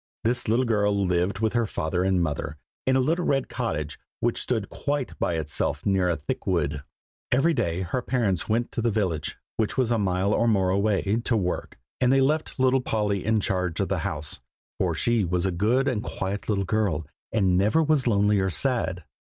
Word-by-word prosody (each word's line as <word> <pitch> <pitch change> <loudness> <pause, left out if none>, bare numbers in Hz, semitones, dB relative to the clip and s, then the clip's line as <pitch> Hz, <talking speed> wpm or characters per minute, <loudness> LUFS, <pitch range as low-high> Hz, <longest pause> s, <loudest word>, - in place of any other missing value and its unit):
This 120 +2 0
little 120 +4 +2
girl 105 -3 +2
lived 90 +3 0
with 110 -1 +1
her 120 -2 +1
father 90 0 -1
and 95 -2 +2
mother, 75 -1 -3 0.3
in 130 - +4
a - - +4
little 165 +7 +1
red 135 -5 +1
cottage 80 - -3 0.2
which - - 0
stood - - -1
quite 145 -2 -2
by 85 - 0
itself 80 -2 -2
near 95 -2 +2
a 85 - +1
thick 75 - -5
wood. 75 -6 0 0.5
Every 140 +7 +3
day 95 - -1
her 95 +8 -2
parents 115 -9 0
went 115 +2 0
to - - -2
the 120 - +2
village, 95 -9 -1 0.2
which 110 +2 -1
was 125 -3 +2
a 115 - +2
mile 95 +1 +1
or 120 - +2
more 95 -5 +3
away, 100 +2 +1
to 115 - +2
work, 90 -3 -3 0.2
and 125 -1 +3
they 135 - +5
left 150 +2 0
little 130 0 +4
Polly 105 -5 -1
in 110 0 +2
charge 90 -4 -1
of 100 - 0
the 95 - 0
house, 75 -2 -3 0.4
for - - +1
she 120 -2 +2
was 90 +1 0
a 95 - +1
good 115 +10 +2
and 120 -6 0
quiet 100 +1 -4
little 100 -2 +1
girl, 95 -7 0 0.3
and 95 -5 +2
never 105 - +3
was 150 -4 +2
lonely 105 -2 +3
or 95 0 +1
sad. 75 -6 -1
105 Hz, 200 wpm, -26 LUFS, 90-120 Hz, 0.5 s, they